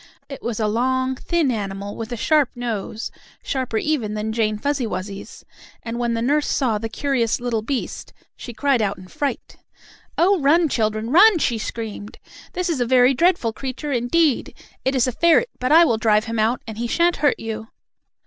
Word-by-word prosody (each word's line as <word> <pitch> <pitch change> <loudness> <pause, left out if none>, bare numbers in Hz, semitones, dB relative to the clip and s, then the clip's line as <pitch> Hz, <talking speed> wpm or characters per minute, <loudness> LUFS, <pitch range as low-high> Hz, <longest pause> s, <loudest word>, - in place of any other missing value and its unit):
It 275 - -8
was 230 -2 -3
a 215 - +1
long, 260 +4 0
thin 325 0 0
animal, 200 -2 -4
with 225 +1 -6
a 240 - -3
sharp 300 +3 +2
nose, 225 -2 -4 0.3
sharper 255 -4 -2
even 230 -6 -1
than 215 +1 -3
Jane 215 -2 0
Fuzzy 280 +1 -1
Wuzzy's, 195 0 -7 0.4
and 230 +1 -4
when 235 -1 0
the 230 - -1
nurse 290 +4 +1
saw 235 -6 0
the 225 +1 -4
curious 245 -3 0
little 240 -2 -1
beast, 255 +4 -4 0.2
she 240 - -8
cried 270 0 +1
out 200 -2 -1
in 185 0 -12
fright: 280 +9 -4 0.6
"Oh, 380 +2 +4
run, 320 +4 +4
children! 220 -1 -1
Run!" 390 +5 +7
she 235 -7 0
screamed. 215 -2 -6 0.4
"This 365 0 -2
is 320 -7 -1
a - - +2
very 255 +1 +5
dreadful 330 -7 +2
creature 270 +5 -5
indeed! 270 +4 +1 0.3
It 265 +1 0
is 255 - +3
a 255 - -1
ferret, 340 - +3
but 255 +2 -1
I 330 +2 +8
will 230 -7 +1
drive 215 -1 +3
him 230 -1 -3
out, 225 +3 +1
and 220 -1 -8
he 240 - -1
shan't 340 +7 +2
hurt 290 -2 +2
you!" 220 0 -5
240 Hz, 190 wpm, -21 LUFS, 220-285 Hz, 0.6 s, I